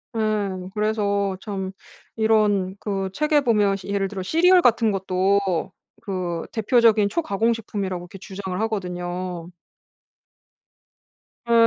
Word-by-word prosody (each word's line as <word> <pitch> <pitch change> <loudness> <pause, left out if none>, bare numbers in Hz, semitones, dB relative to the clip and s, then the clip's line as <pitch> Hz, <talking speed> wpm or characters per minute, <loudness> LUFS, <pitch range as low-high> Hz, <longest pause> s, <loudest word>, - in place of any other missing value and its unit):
예. 205 -4 -1
그래서 200 -2 0
참 190 -3 -4 0.4
이런 210 -4 +2
그 195 -2 -2
책에 300 +2 +2
보면 210 -6 +2
시 195 - -11
예를 200 -1 0
들어 195 -1 -6
시리얼 355 - +4
같은 230 -5 +3
것도 190 -1 0 0.3
그 180 -5 -3
대표적인 220 -2 +3
초가공 230 - +1
식품이라고 195 -5 -4
이렇게 180 +2 -11
주장을 190 -1 -6
하거든요. 180 -4 -3 2.0
예. - - +4
200 Hz, 245 characters per minute, -23 LUFS, 185-220 Hz, 2.0 s, 시리얼